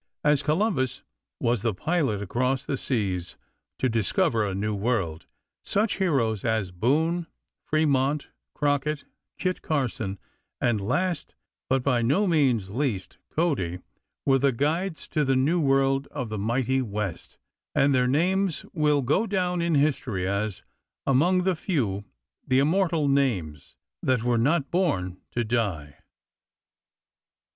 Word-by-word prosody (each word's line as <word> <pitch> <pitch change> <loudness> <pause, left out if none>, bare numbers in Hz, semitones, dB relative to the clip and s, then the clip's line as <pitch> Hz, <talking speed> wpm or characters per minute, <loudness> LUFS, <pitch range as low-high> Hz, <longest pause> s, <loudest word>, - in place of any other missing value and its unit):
As 150 -1 +4
Columbus 155 - 0 0.4
was 120 -2 +1
the 115 -3 0
pilot 135 - 0
across 125 +6 0
the 140 - -1
seas 95 -10 -2 0.4
to 130 - +1
discover 115 - +1
a 100 -2 -2
new 105 +2 -1
world, 100 -7 -1 0.3
such 210 +2 0
heroes 130 - +1
as 110 -5 0
Boone, 160 - +1 0.4
Fremont, 145 -2 +1 0.3
Crockett, 145 +1 0 0.3
Kit 185 -1 -1
Carson, 120 -9 -2 0.4
and 115 -4 +1
last, 175 - -1 0.3
but 130 0 +2
by 125 -3 +2
no 145 - +2
means 130 - +2
least, 120 -6 -2
Cody, 135 - 0 0.5
were 135 -1 +4
the 140 +1 +3
guides 155 +7 -1
to 150 - +1
the 135 -1 +2
New 145 +7 +2
World 135 -1 +2
of 125 -6 -4
the 110 -1 -3
mighty 125 +5 +1
West, 105 -6 -4 0.4
and 140 0 +4
their 125 -1 +3
names 180 +6 +1
will 150 -3 +2
go 170 - +2
down 180 -3 0
in 170 -2 +1
history 130 -10 +1
as 100 0 -2 0.4
"Among 175 +8 +3
the 190 0 +2
few, 115 - -1 0.4
the 130 - +3
immortal 160 +1 +2
names 105 - 0 0.2
That 130 -3 +1
were 120 -1 +2
not 145 +4 +1
born 95 - 0
to 120 - 0
die." 100 -11 -2
135 Hz, 135 wpm, -26 LUFS, 110-155 Hz, 0.5 s, As